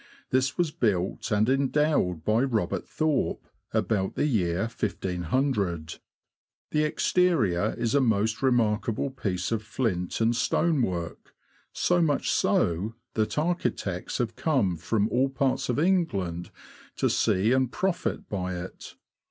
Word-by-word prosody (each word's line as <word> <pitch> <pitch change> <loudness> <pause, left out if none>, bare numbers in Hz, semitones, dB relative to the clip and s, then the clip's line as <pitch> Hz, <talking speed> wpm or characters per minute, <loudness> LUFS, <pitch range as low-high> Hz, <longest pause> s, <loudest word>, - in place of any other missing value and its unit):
This 130 0 +1
was 175 -3 +1
built 100 -4 -1
and 105 0 +2
endowed 135 - +1
by 110 +2 +3
Robert 110 -8 -1
Thorpe, 155 -2 0 0.3
about 100 -3 0
the - - +1
year 95 - +1
1500. 95 - -1 0.7
The 150 - +2
exterior 145 - +2
is 115 -1 -1
a 140 - +4
most 110 -2 +1
remarkable 115 -1 +1
piece 95 -8 -3
of 115 -2 0
flint 105 -6 -2
and 115 +1 +2
stone 155 +4 +1
work; 85 -7 -4 0.4
so 175 0 +2
much 150 -4 +1
so, 95 +7 +1 0.2
that 110 +4 -1
architects 150 - -1
have 115 -2 -2
come 130 - +1
from 100 +6 0
all 130 +2 +2
parts 135 -1 0
of 125 - 0
England 145 - 0 0.5
to - - +1
see 100 +5 +2
and 130 -1 +2
profit 190 -2 -2
by 95 -2 -3
it. 90 +1 -8
115 Hz, 130 wpm, -27 LUFS, 95-135 Hz, 0.7 s, a